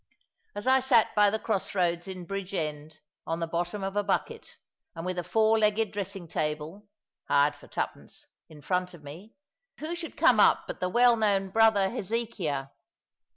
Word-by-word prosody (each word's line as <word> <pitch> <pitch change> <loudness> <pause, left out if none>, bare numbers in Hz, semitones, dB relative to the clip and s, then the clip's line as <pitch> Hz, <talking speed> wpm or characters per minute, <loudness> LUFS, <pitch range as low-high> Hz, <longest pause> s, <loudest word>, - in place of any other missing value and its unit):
As 205 - -6
I 260 +1 +5
sate 260 -4 +3
by 210 -1 +5
the 220 - -1
cross 215 -3 -2
roads 175 -1 0
in 185 -2 -7
Bridgend 160 -6 -4 0.3
on 165 +1 -2
the 165 - -1
bottom 175 +4 -3
of 195 +1 -3
a 205 - +1
bucket, 200 - -3 0.4
and 165 +1 -6
with 185 -1 -2
a - - -3
four 220 +3 +3
legged 215 0 +2
dressing 195 -3 -5
table 155 +7 -4 0.4
(hired 145 +1 +3
for 145 - -16
twopence) - - -5 0.2
in 150 -2 -14
front 180 +1 -1
of 155 - -16
me, 170 +10 -11 0.4
who 315 +3 -5
should 340 -1 -6
come - - +5
up - - +5
but - - -7
the 180 - -1
well 240 +3 +5
known 200 -3 +1
Brother 215 -3 +4
Hezekiah? 200 - -3
195 Hz, 175 wpm, -28 LUFS, 170-220 Hz, 0.4 s, I